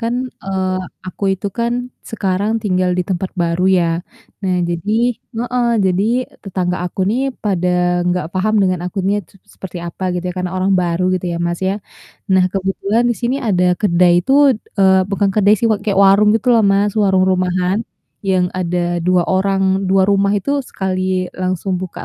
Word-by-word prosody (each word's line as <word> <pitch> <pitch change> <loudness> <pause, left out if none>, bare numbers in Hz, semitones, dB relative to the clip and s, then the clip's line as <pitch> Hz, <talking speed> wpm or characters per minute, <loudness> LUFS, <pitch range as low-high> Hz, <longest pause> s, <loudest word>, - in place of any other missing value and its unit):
kan, 245 +2 -2 0.2
eee, 190 -1 -1 0.3
aku 200 - -6
itu 190 +2 -4
kan 235 0 0 0.4
sekarang 200 0 -1
tinggal 185 -2 +1
di 180 - 0
tempat 185 0 -2
baru 170 0 -1
ya. 185 -2 +3 0.6
Nah 185 -1 +1
jadi 175 +5 -2 0.5
heeh, 245 0 0 0.2
jadi 185 +1 +1 0.4
tetangga 185 -2 -2
aku 180 - -5
nih 265 +5 0
pada 180 -4 0 0.4
nggak 180 -3 -1
paham 215 +4 +1
dengan 185 -2 +1
akunya 195 +2 -1
tuh 195 - -23
s - - -19
seperti 180 -2 -7
apa 190 - -10
gitu 180 0 -3
ya - - -3
karena 180 0 -3
orang 190 +1 +1
baru 175 0 0
gitu 180 - -6
ya, - - -3
Mas, 170 0 -2
ya. 200 +2 -2 0.5
Nah, 190 -1 +4
kebetulan 195 +4 0
di - - 0
sini 245 +2 0
ada 180 -2 +2 0.2
kedai 175 -3 +3
itu, 225 - -1 0.5
eee, 190 -1 +5
bukan 200 0 +1
kedai 210 0 +4
sih 220 - -3
wak 215 - +1
kayak 205 -2 0
warung 200 +2 +5
gitu 240 +3 +1
loh, 230 - +5
Mas, 200 +1 +1
warung 190 -2 +3
rumahan 185 +1 +1 0.4
yang 185 -2 0
ada 175 -1 -1
2 180 +1 +2
orang 190 0 +1
2 190 0 +4
rumah 200 0 +2
itu 205 +7 -2
sekali 185 -5 -2
langsung 185 0 -2
buka 185 -2 -7
190 Hz, 175 wpm, -17 LUFS, 180-200 Hz, 0.6 s, eee